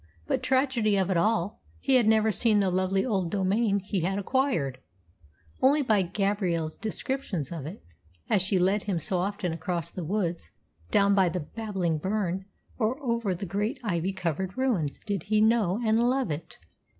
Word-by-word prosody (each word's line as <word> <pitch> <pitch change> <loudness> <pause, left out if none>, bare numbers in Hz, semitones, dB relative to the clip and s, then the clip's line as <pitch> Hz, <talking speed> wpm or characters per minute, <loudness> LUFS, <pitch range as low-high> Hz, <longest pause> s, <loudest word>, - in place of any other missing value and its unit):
But, 270 -4 0
tragedy 255 -5 +2
of 190 0 +1
it - - +1
all, 210 +1 0 0.2
he 270 - 0
had 245 -4 +5
never 220 0 +4
seen 215 +1 +3
the 195 -2 +2
lovely 185 +2 +1
old 195 -8 0
domain 200 +3 +1
he 195 0 -2
had 190 +3 -1
acquired! 200 - 0 0.8
Only 285 +3 +4
by 215 -6 +3
Gabrielle's 185 -4 -1
descriptions 220 - -3
of 155 -4 -5
it, 185 +7 -9 0.4
as 195 - +3
she 190 +1 +1
led 190 +3 +2
him 195 -4 0
so 180 +2 -1
often 195 -2 -2
across 165 0 -3
the 180 - -5
woods, 175 -1 -2 0.4
down 200 0 +4
by 190 -3 +4
the 180 +1 -3
babbling 185 -3 -2
burn, 190 0 -1 0.3
or 240 +4 0
over 235 -8 -1
the 195 +3 -5
great 205 +7 -2
ivy 180 -3 -1
covered 185 - -3
ruins, 215 - 0
did 200 -5 -3
he 215 -1 +3
know 215 -3 +3
and 220 +1 +3
love 250 -4 +1
it. 155 +3 -6
200 Hz, 175 wpm, -27 LUFS, 180-220 Hz, 0.8 s, had